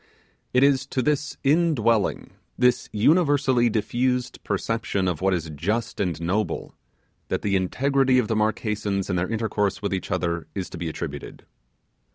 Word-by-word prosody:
It 125 Hz, +1 st, +4 dB
is 135 Hz, -1 st, +3 dB
to 130 Hz, -, -1 dB
this 150 Hz, +1 st, -1 dB
indwelling, 135 Hz, -, +2 dB, 0.3 s
this 125 Hz, -1 st, +2 dB
universally 140 Hz, -, +3 dB
diffused 125 Hz, +3 st, -1 dB
perception 100 Hz, -1 st, -1 dB
of 90 Hz, -4 st, -2 dB
what 95 Hz, +1 st, +2 dB
is 85 Hz, -3 st, -2 dB
just 105 Hz, +9 st, -2 dB
and 90 Hz, -6 st, -1 dB
noble, 90 Hz, +2 st, -2 dB, 0.5 s
that -, -, -2 dB
the 100 Hz, -1 st, +1 dB
integrity 130 Hz, +7 st, +2 dB
of 125 Hz, -4 st, +2 dB
the 110 Hz, -, 0 dB
Marquesans 105 Hz, -2 st, -1 dB
in -, -, 0 dB
their 90 Hz, +1 st, -1 dB
intercourse 110 Hz, -2 st, -1 dB
with 100 Hz, -2 st, -2 dB
each 95 Hz, -, -3 dB
other, 85 Hz, -1 st, -1 dB
is 95 Hz, -2 st, -4 dB
to -, -, -7 dB
be 85 Hz, -, -2 dB
attributed. 75 Hz, -3 st, -7 dB
110 Hz, 155 wpm, -24 LUFS, 95-130 Hz, 0.5 s, It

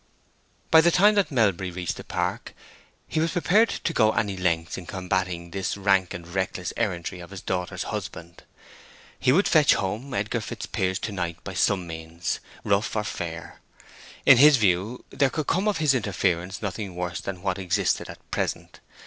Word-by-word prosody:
By 160 Hz, -, +8 dB
the 170 Hz, -, +5 dB
time 200 Hz, +5 st, +5 dB
that 200 Hz, -2 st, +2 dB
Melbury 100 Hz, -, +1 dB
reached 90 Hz, -1 st, -3 dB
the -, -, -8 dB
park, -, -, -3 dB, 0.5 s
he -, -, -1 dB
was 165 Hz, +1 st, 0 dB
prepared 205 Hz, +6 st, +3 dB
to 170 Hz, -, -2 dB
go 110 Hz, -5 st, +4 dB
any 100 Hz, -2 st, 0 dB
lengths 85 Hz, -3 st, 0 dB
in 90 Hz, -, -8 dB
combating 90 Hz, -2 st, -2 dB
this 95 Hz, +1 st, -2 dB
rank 95 Hz, -2 st, +2 dB
and 85 Hz, -1 st, -8 dB
reckless 90 Hz, -1 st, -3 dB
errantry 90 Hz, -5 st, -2 dB
of 85 Hz, -, -10 dB
his 100 Hz, -1 st, -8 dB
daughter's 90 Hz, -1 st, -2 dB
husband. 85 Hz, +1 st, -6 dB, 0.8 s
He 130 Hz, -, +3 dB
would 185 Hz, +9 st, +4 dB
fetch 155 Hz, -3 st, +5 dB
home 110 Hz, +8 st, -3 dB
Edgar 110 Hz, +3 st, -1 dB
Fitzpiers 95 Hz, -2 st, -2 dB
to 110 Hz, -, -3 dB
night 85 Hz, -4 st, -4 dB
by -, -, -6 dB
some 95 Hz, -3 st, +1 dB
means, 80 Hz, +1 st, -4 dB, 0.2 s
rough 100 Hz, +3 st, +1 dB
or 105 Hz, -, 0 dB
fair: 85 Hz, -4 st, -6 dB, 0.7 s
in 135 Hz, -, +9 dB
his 145 Hz, +2 st, +8 dB
view 100 Hz, +3 st, 0 dB
there 140 Hz, -1 st, +2 dB
could 155 Hz, +2 st, -3 dB
come 190 Hz, +8 st, +1 dB
of 205 Hz, -4 st, +1 dB
his 155 Hz, -4 st, +3 dB
interference 95 Hz, -4 st, -1 dB
nothing 100 Hz, -1 st, -4 dB
worse 90 Hz, -1 st, -3 dB
than 95 Hz, -2 st, -6 dB
what 95 Hz, -1 st, -1 dB
existed 90 Hz, -3 st, 0 dB
at -, -, -12 dB
present. -, -, -3 dB
95 Hz, 175 wpm, -25 LUFS, 90-125 Hz, 0.8 s, in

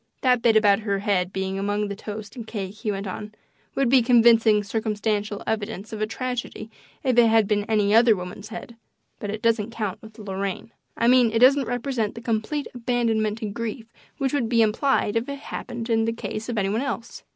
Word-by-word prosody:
"That 250 Hz, -2 st, +3 dB
bit 225 Hz, -2 st, +4 dB
about 205 Hz, -2 st, +4 dB
her 205 Hz, -2 st, -1 dB
head 195 Hz, -3 st, 0 dB
being 190 Hz, 0 st, -3 dB
among 205 Hz, +1 st, -1 dB
the 200 Hz, -, -5 dB
toast 210 Hz, +1 st, -8 dB
and 235 Hz, -3 st, -8 dB
cake," 195 Hz, -4 st, -5 dB
he 215 Hz, +1 st, -5 dB
went 200 Hz, 0 st, -4 dB
on, 210 Hz, +2 st, -6 dB, 0.4 s
"would 275 Hz, -1 st, +2 dB
be 255 Hz, +1 st, +5 dB
convincing 230 Hz, -3 st, +5 dB
circumstantial 210 Hz, -1 st, -2 dB
evidence 220 Hz, -1 st, -3 dB
of 215 Hz, -, -5 dB
a 215 Hz, -, +1 dB
tragedy 245 Hz, -1 st, -5 dB, 0.3 s
if 255 Hz, -2 st, +2 dB
it 235 Hz, -, +6 dB
had 225 Hz, -2 st, +4 dB
been 205 Hz, -1 st, +1 dB
any 210 Hz, -2 st, +2 dB
other 230 Hz, 0 st, +6 dB
woman's 180 Hz, +3 st, -7 dB
head, 230 Hz, +1 st, -8 dB, 0.4 s
but 205 Hz, -, -5 dB
it 215 Hz, +1 st, -5 dB
doesn't 230 Hz, -2 st, +2 dB
count 210 Hz, -3 st, -4 dB
with 220 Hz, -1 st, -14 dB
Lorraine 195 Hz, 0 st, -4 dB, 0.3 s
I 235 Hz, -, +2 dB
mean 250 Hz, -1 st, +5 dB
it 225 Hz, -, 0 dB
doesn't 260 Hz, +2 st, +5 dB
represent 245 Hz, -3 st, -2 dB
the 230 Hz, -, -8 dB
complete 230 Hz, +6 st, -2 dB
abandonment 230 Hz, -3 st, 0 dB
to 225 Hz, -, -5 dB
grief 225 Hz, +2 st, -5 dB, 0.2 s
which 270 Hz, -2 st, -1 dB
would 245 Hz, -6 st, 0 dB
be 230 Hz, -1 st, +4 dB
implied 220 Hz, 0 st, +1 dB
if 230 Hz, +4 st, -1 dB
it 280 Hz, -, -4 dB
happened 240 Hz, -4 st, -6 dB
in 225 Hz, -1 st, +2 dB
the 230 Hz, -, 0 dB
case 225 Hz, 0 st, -5 dB
of 235 Hz, -, -3 dB
any 195 Hz, -2 st, +1 dB
one 220 Hz, +4 st, 0 dB
else. 235 Hz, -4 st, -5 dB
220 Hz, 205 wpm, -24 LUFS, 205-235 Hz, 0.4 s, it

